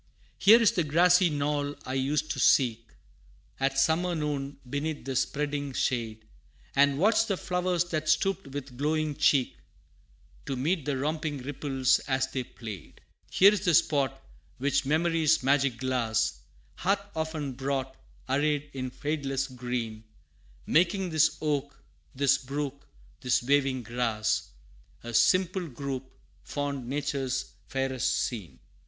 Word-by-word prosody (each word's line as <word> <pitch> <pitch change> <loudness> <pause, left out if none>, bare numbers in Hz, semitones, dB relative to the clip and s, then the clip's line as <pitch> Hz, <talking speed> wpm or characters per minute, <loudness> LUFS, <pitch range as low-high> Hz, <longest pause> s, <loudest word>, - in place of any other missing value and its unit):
Here 220 +4 +8
is 230 - +5
the 185 -7 0
grassy 175 +4 +4
knoll 145 -1 -1
I 130 - -4
used 145 +3 0
to - - -3
seek 115 -4 +3 0.7
At 135 0 0
summer 170 +5 +2
noon, 145 -2 -3
beneath 145 +3 -3
the 135 -1 -3
spreading 145 +1 -1
shade, 115 -4 -2 0.5
And 140 0 +4
watch 215 +6 +3
the 195 - 0
flowers 180 -1 0
that 155 -1 -1
stooped 195 +3 +1
with 135 -2 -7
glowing 155 0 0
cheek, 140 -3 +2 0.9
To 135 - -2
meet 155 +4 -1
the 140 -2 -1
romping 150 -1 -2
ripples 135 -1 +1
as 130 -1 +1
they 130 -1 -2
played. 110 -7 -10 0.3
Here 200 +3 +6
is 205 -2 -2
the 175 -5 +3
spot 145 -5 +2 0.4
which 140 0 0
memory's 160 -1 +2
magic 135 -2 +2
glass 115 - 0 0.4
Hath 195 +2 0
often 160 -3 -3
brought, 135 0 -3 0.3
arrayed 145 +2 0
in 130 -1 -4
fadeless 140 -1 -2
green, 120 -4 -4 0.6
Making 180 +2 +2
this 160 0 +3
oak, 145 -2 -2 0.4
this 140 0 +3
brook, 140 +1 -5 0.3
this 125 -1 +1
waving 135 -1 +1
grass 115 -2 -1 0.5
A 120 0 -7
simple 180 - +3
group 135 -1 -5 0.3
fond 140 -3 -4
Nature's 135 -1 -2 0.2
fairest 135 -2 -1
scene. 90 - -5
140 Hz, 130 wpm, -28 LUFS, 130-155 Hz, 0.9 s, Here